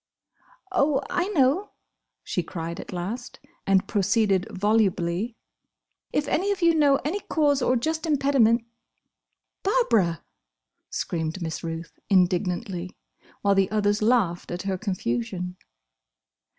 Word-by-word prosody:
"Oh! 295 Hz, -6 st, +2 dB
I 355 Hz, +1 st, +1 dB
know!" 335 Hz, +1 st, +2 dB, 0.5 s
she 180 Hz, -, -1 dB
cried 170 Hz, 0 st, -6 dB
at -, -, -8 dB
last, 205 Hz, +8 st, -5 dB, 0.3 s
and 195 Hz, -1 st, +3 dB
proceeded 200 Hz, -2 st, +2 dB
volubly, 205 Hz, 0 st, +1 dB, 0.8 s
"'If 295 Hz, -1 st, 0 dB
any 385 Hz, +7 st, +1 dB
of 390 Hz, -3 st, -2 dB
you 335 Hz, -1 st, +6 dB
know 290 Hz, -3 st, +4 dB
of -, -, -2 dB
any 350 Hz, +8 st, -1 dB
cause 290 Hz, -7 st, +1 dB
or 250 Hz, +1 st, +2 dB
just 315 Hz, +6 st, -1 dB
impediment—'" 270 Hz, -6 st, +3 dB, 1.0 s
"Barbara!" 230 Hz, -, +2 dB, 0.7 s
screamed 160 Hz, +1 st, -3 dB
Miss 160 Hz, -2 st, -4 dB
Ruth, 165 Hz, 0 st, -6 dB
indignantly, 180 Hz, 0 st, +1 dB, 0.5 s
while 200 Hz, 0 st, +4 dB
the 195 Hz, -1 st, +2 dB
others 205 Hz, 0 st, +1 dB
laughed 210 Hz, -7 st, +2 dB
at 175 Hz, +2 st, -4 dB
her 195 Hz, -1 st, -1 dB
confusion. 180 Hz, -, -3 dB
210 Hz, 120 wpm, -25 LUFS, 180-280 Hz, 1.0 s, you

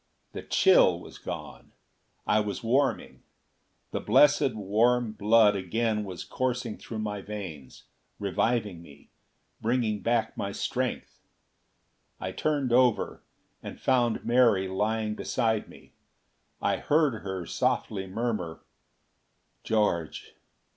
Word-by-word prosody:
The -, -, -6 dB
chill -, -, +4 dB
was -, -, -12 dB
gone. -, -, -8 dB, 0.5 s
I 105 Hz, -, +3 dB
was 105 Hz, +3 st, -3 dB
warming. 130 Hz, +1 st, 0 dB, 0.7 s
The -, -, -2 dB
blessed 135 Hz, +2 st, +4 dB
warm 110 Hz, +3 st, +2 dB
blood 105 Hz, 0 st, +4 dB
again 105 Hz, +3 st, -1 dB
was 95 Hz, -3 st, -7 dB
coursing 125 Hz, -3 st, -3 dB
through 115 Hz, -, -7 dB
my 105 Hz, -2 st, -3 dB
veins, 95 Hz, -10 st, -8 dB, 0.3 s
reviving 105 Hz, -2 st, -1 dB
me, 70 Hz, -4 st, -17 dB, 0.5 s
bringing 115 Hz, -2 st, 0 dB
back 115 Hz, -1 st, 0 dB
my 100 Hz, 0 st, -4 dB
strength. 130 Hz, +4 st, -3 dB, 1.0 s
I 95 Hz, -, -4 dB
turned 140 Hz, +4 st, -1 dB
over, 125 Hz, -2 st, +2 dB, 0.4 s
and -, -, -8 dB
found 120 Hz, -3 st, +1 dB
Mary 115 Hz, -6 st, +4 dB
lying 105 Hz, +3 st, -1 dB
beside 110 Hz, -1 st, -1 dB
me. -, -, -16 dB, 0.7 s
I -, -, +2 dB
heard 145 Hz, -7 st, +1 dB
her 95 Hz, -2 st, -5 dB
softly 95 Hz, +3 st, -1 dB
murmur: 100 Hz, -5 st, -3 dB, 1.0 s
"George! 85 Hz, -8 st, -1 dB
110 Hz, 110 wpm, -28 LUFS, 100-120 Hz, 1.0 s, chill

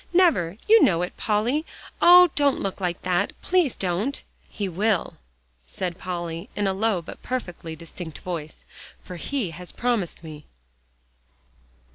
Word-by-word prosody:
Never; 300 Hz, -, +3 dB
you 445 Hz, 0 st, +7 dB
know 170 Hz, -1 st, +3 dB
it, 180 Hz, -, -5 dB
Polly. 230 Hz, +8 st, 0 dB, 0.4 s
Oh! 355 Hz, -1 st, +8 dB
don't 285 Hz, -2 st, +2 dB
look 195 Hz, 0 st, -3 dB
like 175 Hz, -1 st, -2 dB
that; 185 Hz, +2 st, +1 dB
please 355 Hz, -8 st, +2 dB
don't." 195 Hz, +9 st, -1 dB, 0.3 s
"He 205 Hz, -, -3 dB
will," 195 Hz, +2 st, 0 dB, 0.5 s
said 180 Hz, -, -4 dB
Polly, 175 Hz, +2 st, -5 dB
in 205 Hz, -, 0 dB
a 195 Hz, -, +1 dB
low 200 Hz, -3 st, 0 dB
but -, -, -10 dB
perfectly 175 Hz, -10 st, -5 dB
distinct 165 Hz, 0 st, -8 dB
voice, 165 Hz, -4 st, -6 dB, 0.4 s
"for 180 Hz, -, -8 dB
he 235 Hz, -2 st, -2 dB
has 180 Hz, +2 st, -9 dB
promised 230 Hz, -9 st, -1 dB
me." 150 Hz, -2 st, -10 dB
190 Hz, 140 wpm, -24 LUFS, 170-245 Hz, 0.5 s, Oh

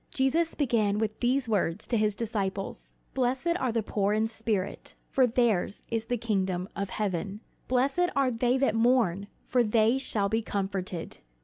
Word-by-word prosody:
Jesus 315 Hz, +5 st, +1 dB
began 225 Hz, -7 st, +1 dB
with 215 Hz, 0 st, -2 dB
these 250 Hz, +1 st, +1 dB
words 205 Hz, -3 st, 0 dB
to 240 Hz, -, 0 dB
his 215 Hz, -2 st, +2 dB
disciples: 200 Hz, -4 st, -3 dB, 0.2 s
"Blessed 265 Hz, +6 st, 0 dB
are 255 Hz, -2 st, 0 dB
the 225 Hz, -1 st, 0 dB
poor 205 Hz, 0 st, 0 dB
in 215 Hz, +1 st, +2 dB
spirit: 220 Hz, -4 st, -3 dB, 0.2 s
for 260 Hz, -2 st, +4 dB
theirs 225 Hz, -5 st, +1 dB
is 225 Hz, -1 st, -1 dB
the 245 Hz, -, 0 dB
kingdom 190 Hz, -5 st, -1 dB
of 200 Hz, -1 st, -3 dB
heaven. 200 Hz, 0 st, -2 dB, 0.3 s
"Blessed 275 Hz, +8 st, +2 dB
are 275 Hz, -2 st, +3 dB
they 245 Hz, +2 st, +1 dB
that 265 Hz, -4 st, +2 dB
mourn: 225 Hz, -5 st, +2 dB, 0.2 s
for 250 Hz, -, +2 dB
they 225 Hz, +3 st, +3 dB
shall 210 Hz, -6 st, 0 dB
be 225 Hz, +3 st, 0 dB
comforted. 195 Hz, -5 st, -4 dB
225 Hz, 165 wpm, -28 LUFS, 200-250 Hz, 0.3 s, for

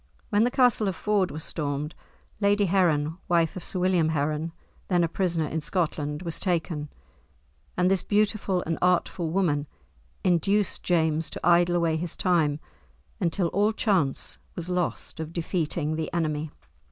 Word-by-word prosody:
When 210 Hz, +2 st, +4 dB
the -, -, +2 dB
castle 245 Hz, -4 st, +3 dB
of 190 Hz, -, -1 dB
Ford 205 Hz, 0 st, +1 dB
was 155 Hz, +1 st, -5 dB
stormed, 150 Hz, -1 st, -3 dB, 0.5 s
Lady 205 Hz, 0 st, +3 dB
Heron, 170 Hz, -4 st, +2 dB
wife 170 Hz, -2 st, +2 dB
of 185 Hz, -, -6 dB
Sir -, -, -3 dB
William 180 Hz, -3 st, +2 dB
Heron, 155 Hz, +1 st, -1 dB, 0.4 s
then 175 Hz, -2 st, +2 dB
a -, -, +2 dB
prisoner 170 Hz, -2 st, 0 dB
in 160 Hz, +1 st, -3 dB
Scotland, 150 Hz, -2 st, -2 dB
was 170 Hz, -2 st, -2 dB
taken, 165 Hz, -5 st, -1 dB, 0.9 s
and 180 Hz, +1 st, +3 dB
this 190 Hz, -2 st, +3 dB
beautiful 205 Hz, -3 st, +1 dB
and 165 Hz, 0 st, -2 dB
artful 180 Hz, -1 st, +1 dB
woman 155 Hz, -5 st, +1 dB, 0.6 s
induced 195 Hz, +3 st, +2 dB
James 160 Hz, -2 st, +1 dB
to -, -, -4 dB
idle 175 Hz, 0 st, +5 dB
away 165 Hz, -2 st, +2 dB
his 170 Hz, 0 st, -3 dB
time 160 Hz, -5 st, +2 dB, 0.6 s
until 175 Hz, -1 st, 0 dB
all 205 Hz, +5 st, +2 dB
chance 190 Hz, -, 0 dB, 0.2 s
was 175 Hz, 0 st, -5 dB
lost 180 Hz, -2 st, -2 dB
of 160 Hz, 0 st, -5 dB
defeating 160 Hz, -2 st, -1 dB
the 160 Hz, 0 st, -3 dB
enemy. 155 Hz, -2 st, -1 dB
170 Hz, 155 wpm, -26 LUFS, 155-185 Hz, 0.9 s, idle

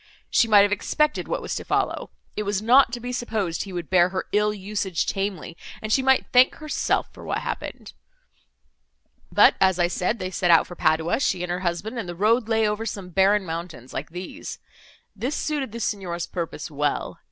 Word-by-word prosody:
She 230 Hz, -, +4 dB
might 210 Hz, -2 st, +7 dB
have 205 Hz, -, +1 dB
expected 300 Hz, +9 st, 0 dB
what -, -, -2 dB
was -, -, -3 dB
to -, -, -4 dB
follow; -, -, -1 dB, 0.3 s
it -, -, -2 dB
was 205 Hz, -1 st, -1 dB
not 240 Hz, +4 st, +5 dB
to 240 Hz, -, -4 dB
be 245 Hz, +1 st, -5 dB
supposed 220 Hz, -8 st, -2 dB
he 195 Hz, -, -9 dB
would 175 Hz, -3 st, -5 dB
bear 180 Hz, +1 st, +4 dB
her 185 Hz, 0 st, -3 dB
ill 210 Hz, +1 st, +2 dB
usage 200 Hz, -4 st, -2 dB
tamely, 195 Hz, -4 st, -3 dB, 0.2 s
and 215 Hz, 0 st, -2 dB
she 270 Hz, -, +4 dB
might 265 Hz, 0 st, +3 dB
thank 250 Hz, +1 st, +6 dB
herself 305 Hz, -1 st, -1 dB
for -, -, -12 dB
what -, -, -2 dB
happened. -, -, -6 dB, 1.4 s
But, -, -, +6 dB
as 190 Hz, -2 st, +4 dB
I 175 Hz, -1 st, +3 dB
said, 180 Hz, +5 st, -1 dB
they 185 Hz, -2 st, -4 dB
set 180 Hz, 0 st, 0 dB
out 165 Hz, -1 st, +6 dB
for 175 Hz, -, -10 dB
Padua, 160 Hz, +3 st, +1 dB
she 185 Hz, -10 st, 0 dB
and 180 Hz, -, -3 dB
her 180 Hz, -, -1 dB
husband, 190 Hz, +6 st, -3 dB
and 190 Hz, -6 st, -5 dB
the 175 Hz, -, -5 dB
road 220 Hz, +5 st, +2 dB
lay 220 Hz, -1 st, +3 dB
over 210 Hz, +1 st, -2 dB
some 200 Hz, -4 st, -5 dB
barren 195 Hz, +2 st, +3 dB
mountains 165 Hz, -7 st, -6 dB
like 140 Hz, -, -4 dB
these. 180 Hz, +2 st, -7 dB, 0.6 s
This 245 Hz, +8 st, -2 dB
suited 290 Hz, -6 st, -2 dB
the 235 Hz, -, -6 dB
Signor's 180 Hz, -6 st, -2 dB
purpose 170 Hz, -1 st, -5 dB
well. 145 Hz, 0 st, -2 dB
195 Hz, 200 wpm, -24 LUFS, 175-225 Hz, 1.4 s, might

